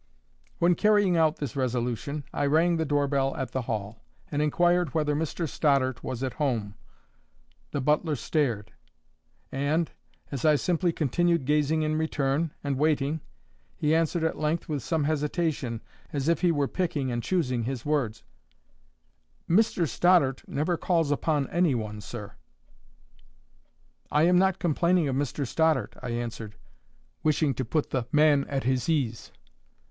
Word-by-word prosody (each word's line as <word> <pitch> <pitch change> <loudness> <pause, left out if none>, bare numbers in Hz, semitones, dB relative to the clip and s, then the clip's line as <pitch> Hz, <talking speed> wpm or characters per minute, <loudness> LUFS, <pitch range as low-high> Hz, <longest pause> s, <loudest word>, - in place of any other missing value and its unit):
When, 175 +1 +4
carrying 205 -1 +3
out 160 -1 +3
this 140 -6 -5
resolution, 130 +3 -2
I 145 - 0
rang 165 +4 +3
the 160 - 0
doorbell 140 -2 +1
at 130 -3 -4
the 130 - -1
Hall, 110 -3 -4 0.3
and 145 0 0
inquired 175 +1 +2
whether 150 -2 +1
Mr 160 +2 -2
Stoddart 135 -4 +1
was 130 0 -4
at 130 - -2
home, 115 -8 0 1.0
the 145 - -2
butler 150 +3 +1
stared; 120 -5 -1 0.8
and, 145 +5 0 0.4
as 135 -4 -4
I 155 -1 +5
simply 175 +3 +1
continued 170 +1 +1
gazing 150 +2 +2
in 155 0 0
return, 150 0 0
and 140 -2 -1
waiting, 150 0 +1 0.6
he 150 +1 +1
answered 165 +1 +1
at 160 - -1
length, 155 +2 -1
with 150 -3 -2
some 150 +5 -1
hesitation, 150 -5 -1 0.3
as 140 0 -2
if 170 - +2
he 175 -2 +4
were 145 -3 +1
picking 150 -8 -2
and 120 0 -2
choosing 125 -5 0
his 130 -1 -4
words: 140 -8 -1 1.2
"Mr 180 -2 +3
Stoddart 145 -2 +3
never 165 +4 -1
calls 165 -3 +1
upon 145 0 0
any 170 -5 +2
one, 105 -2 -4
sir." 105 -1 -7 1.8
"I 150 - +3
am 180 +1 +5
not 190 0 +2
complaining 170 0 +2
of 130 - -1
Mr 140 +1 -1
Stoddart," 155 -3 +1
I 125 - -5
answered, 115 -2 -4 0.7
wishing 155 -2 +2
to 130 - -3
put 140 +6 -1
the 125 -3 -1
man 150 -2 +4
at 135 -1 -2
his 130 +3 0
ease. 130 -9 -1
145 Hz, 150 wpm, -27 LUFS, 130-160 Hz, 1.8 s, I